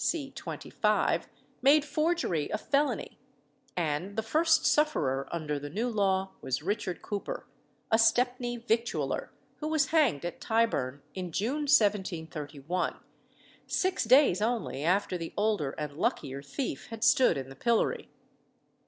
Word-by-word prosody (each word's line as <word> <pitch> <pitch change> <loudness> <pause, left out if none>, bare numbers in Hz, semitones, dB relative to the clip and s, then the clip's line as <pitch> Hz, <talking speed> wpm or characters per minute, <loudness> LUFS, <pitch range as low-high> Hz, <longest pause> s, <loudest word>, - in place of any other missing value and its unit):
25, - - -1 0.3
made 285 +3 +5
forgery 305 - 0
a - - -1
felony; 280 +6 -1 0.6
and 175 +4 -1
the 220 - -1
first 320 +7 +3
sufferer 140 - +2
under 150 -3 -2
the 145 +1 -6
new 215 +10 -1
law 195 -4 +1
was 130 +3 -2
Richard 195 -2 -2
Cooper, 205 -1 -4 0.5
a 220 - +5
Stepney 245 +2 +2
victualler, 230 0 -1 0.3
who 305 - -4
was 310 -3 +1
hanged 290 - +2
at 175 - -5
Tyburn, 180 - 0
in 180 -2 -5
June 265 - -1
1731, 175 - 0 0.7
six 375 0 0
days 250 -5 +5
only 220 - -1
after 185 +1 +1
the 165 - -6
older 205 -10 0
and 150 -2 -4
luckier 140 -3 -1
thief 195 - -4
had 225 0 -6
stood 250 - +5
in 135 -1 -5
the 135 - -10
pillory. 235 - 0
210 Hz, 130 wpm, -29 LUFS, 160-250 Hz, 0.7 s, made